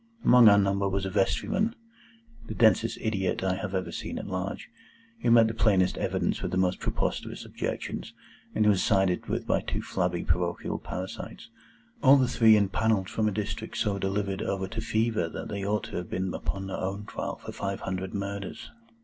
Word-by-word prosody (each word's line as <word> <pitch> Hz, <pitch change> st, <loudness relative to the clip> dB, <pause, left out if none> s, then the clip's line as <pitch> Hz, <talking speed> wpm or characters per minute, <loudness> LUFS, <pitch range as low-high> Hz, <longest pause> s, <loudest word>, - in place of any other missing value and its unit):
Among 125 Hz, -3 st, +8 dB
our 100 Hz, -, +6 dB
number 100 Hz, 0 st, +2 dB
was 95 Hz, 0 st, -1 dB
a 95 Hz, -, -3 dB
vestryman,—the 230 Hz, -, -3 dB
densest 115 Hz, 0 st, +3 dB
idiot 95 Hz, -5 st, -1 dB
I 95 Hz, -1 st, +1 dB
have 95 Hz, 0 st, -4 dB
ever 95 Hz, -, -2 dB
seen -, -, -5 dB
at -, -, -5 dB
large,—who 115 Hz, -, -6 dB
met 115 Hz, -1 st, +7 dB
the 110 Hz, -, -2 dB
plainest 100 Hz, -5 st, +3 dB
evidence -, -, -1 dB
with -, -, -2 dB
the 90 Hz, -, -2 dB
most 95 Hz, -1 st, +1 dB
preposterous -, -, -3 dB
objections, -, -, -5 dB, 0.4 s
and 110 Hz, -, +3 dB
who 105 Hz, -, +6 dB
was 95 Hz, -, +1 dB
sided 95 Hz, -3 st, +2 dB
with -, -, -2 dB
by -, -, +1 dB
two -, -, -4 dB
flabby 90 Hz, -2 st, -1 dB
parochial 85 Hz, +1 st, -1 dB
parasites; 95 Hz, +1 st, -7 dB, 0.5 s
all 135 Hz, +2 st, +7 dB
the 130 Hz, -2 st, +3 dB
three 110 Hz, -2 st, +6 dB
impanelled 100 Hz, 0 st, +1 dB
from 110 Hz, -1 st, 0 dB
a -, -, +1 dB
district 110 Hz, +2 st, -4 dB
so 100 Hz, -3 st, 0 dB
delivered 100 Hz, 0 st, -1 dB
over 95 Hz, -1 st, -2 dB
to 115 Hz, -, -4 dB
Fever 110 Hz, -6 st, 0 dB
that -, -, -6 dB
they 100 Hz, -1 st, -4 dB
ought 105 Hz, +1 st, 0 dB
to -, -, -6 dB
have 90 Hz, -, -5 dB
been 95 Hz, 0 st, -2 dB
upon 95 Hz, -1 st, -3 dB
their 95 Hz, -, -4 dB
own 100 Hz, +2 st, -3 dB
trial -, -, -4 dB
for -, -, -9 dB
five 100 Hz, 0 st, -4 dB
hundred 95 Hz, 0 st, -4 dB
Murders. 100 Hz, 0 st, -5 dB
100 Hz, 185 wpm, -28 LUFS, 95-110 Hz, 0.5 s, Among